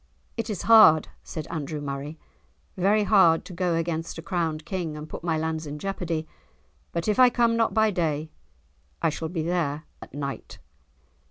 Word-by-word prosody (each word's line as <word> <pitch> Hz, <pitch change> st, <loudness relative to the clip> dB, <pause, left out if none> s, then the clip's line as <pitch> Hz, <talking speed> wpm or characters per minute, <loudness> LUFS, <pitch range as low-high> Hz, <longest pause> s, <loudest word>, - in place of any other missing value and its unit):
"It 230 Hz, 0 st, -4 dB
is 205 Hz, -5 st, -3 dB
hard," 215 Hz, -9 st, +7 dB
said 155 Hz, -2 st, -6 dB
Andrew 155 Hz, -1 st, -4 dB
Murray, 145 Hz, +2 st, -5 dB, 0.6 s
"very 200 Hz, +3 st, +3 dB
hard 190 Hz, -6 st, +4 dB
to 185 Hz, -, -9 dB
go 175 Hz, -1 st, 0 dB
against 165 Hz, 0 st, -2 dB
a 165 Hz, -, -7 dB
crowned 165 Hz, -4 st, -2 dB
King 170 Hz, -4 st, -4 dB
and 150 Hz, +1 st, -7 dB
put -, -, -8 dB
my 165 Hz, -2 st, 0 dB
lands 160 Hz, 0 st, -3 dB
in 145 Hz, +1 st, -6 dB
jeopardy; 165 Hz, -3 st, -3 dB, 0.6 s
but 170 Hz, +2 st, -3 dB
if 210 Hz, +1 st, +1 dB
I 255 Hz, -1 st, +8 dB
come 235 Hz, -1 st, +2 dB
not 230 Hz, 0 st, +1 dB
by 220 Hz, -1 st, +4 dB
day 155 Hz, -4 st, -1 dB, 0.7 s
I 165 Hz, -, +3 dB
shall 160 Hz, +1 st, -4 dB
be 165 Hz, -2 st, -3 dB
there 160 Hz, -3 st, -1 dB, 0.2 s
at -, -, -11 dB
night." 140 Hz, -2 st, -6 dB
165 Hz, 175 wpm, -26 LUFS, 155-195 Hz, 0.7 s, I